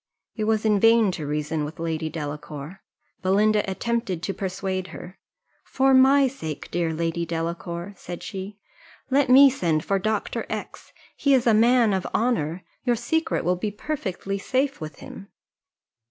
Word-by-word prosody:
It 215 - -2
was 220 0 +1
in 210 -2 +3
vain 225 -1 +5
to 155 -5 -5
reason 150 +1 -2
with 150 +2 -6
Lady 160 -1 -2
Delacour. 150 +2 -7 0.4
Belinda 210 +3 +3
attempted 205 -3 -2
to 195 - -2
persuade 190 -1 -3
her: 185 0 -10 0.4
"For 270 0 +2
my 270 +1 +6
sake, 160 - -6
dear 170 -1 0
Lady 165 +1 -2
Delacour," 170 +2 -4
said 175 -1 -8
she, 195 0 -7 0.5
"let 275 -1 +3
me 270 +2 +9
send 165 - 0
for 195 -1 +1
Dr. 215 +2 -2
X; - - -6 0.2
he 280 -1 +3
is 250 - +1
a 230 - +5
man 230 0 +4
of 190 -1 -1
honour, 185 -8 0 0.2
your 245 -2 +2
secret 280 - -1
will 180 +1 +2
be 210 +4 -2
perfectly 200 -5 -4
safe 265 - -1
with 155 -2 -6
him." 195 - -10
195 Hz, 155 wpm, -24 LUFS, 170-235 Hz, 0.5 s, me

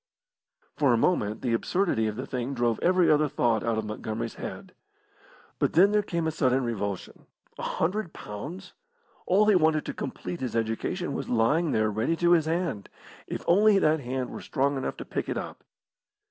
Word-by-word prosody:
For 140 -5 +4
a - - +3
moment 110 - 0
the 120 -3 0
absurdity 115 - +1
of 105 - -3
the 130 +4 -5
thing 130 +1 -3
drove 120 -2 +1
every 180 0 +3
other 150 0 +4
thought 115 -4 +1
out 115 -1 0
of 110 - -2
Montgomery's 110 +1 -4
head. - - -8 0.9
But - - +1
then 195 +4 +6
there 210 0 +3
came 170 -5 -2
a 160 - +1
sudden 130 -4 +1
revulsion. 100 -5 -4 0.3
A - - -4
hundred 185 +2 -1
pounds! 145 - -8 0.5
all 200 +4 +4
he 210 - +5
wanted 155 -4 +3
to - - -4
complete 175 - -5
his 125 -4 -3
education 115 - -2
was - - -4
lying 145 +8 +2
there 110 0 +1
ready 110 +10 0
to 175 +1 +2
his 165 -3 +4
hand, 165 - -2 0.4
if - - -5
only 205 +3 +5
that 155 -4 +3
hand 130 -1 -3
were - - -7
strong 140 0 0
enough 135 - -3
to - - -7
pick - - -4
it - - -2
up. - - -7
140 Hz, 190 wpm, -27 LUFS, 115-175 Hz, 0.9 s, then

